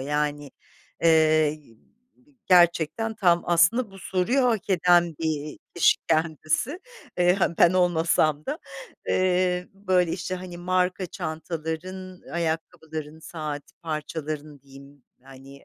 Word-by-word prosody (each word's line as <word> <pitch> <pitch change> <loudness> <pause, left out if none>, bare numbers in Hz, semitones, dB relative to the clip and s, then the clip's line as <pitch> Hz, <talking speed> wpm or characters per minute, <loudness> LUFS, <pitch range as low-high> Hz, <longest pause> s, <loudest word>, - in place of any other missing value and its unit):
Yani, 145 +1 -2 0.5
eee, 155 -2 +4
g 150 -7 -19 0.7
gerçekten 175 +4 +3
tam 175 -5 +3
aslında 175 +7 +3
bu 195 - -13
soruyu 190 +9 0
hak 225 -5 0
eden 175 -2 +4
bir, 165 - -4
iii, 155 -1 -3 0.2
kişi 170 - +4
kendisi. 160 - 0 0.4
Eee, 180 0 +4
-ha, 170 -1 0
ben 175 - +6
olmasam 165 -4 +2
da 295 +3 -3 0.5
eee, 180 -1 +1
böyle 185 -4 +1
işte, 185 0 -3
hani, 180 -1 -8
marka 185 +1 0
çantaların, 165 +4 -6
ayakkabıların, 160 -2 -4
saat 155 -3 -6 0.2
parçalarının 155 -2 -5
diyeyim, 140 +1 -16 0.2
yani, 135 +1 -15
165 Hz, 115 wpm, -25 LUFS, 155-180 Hz, 0.7 s, ben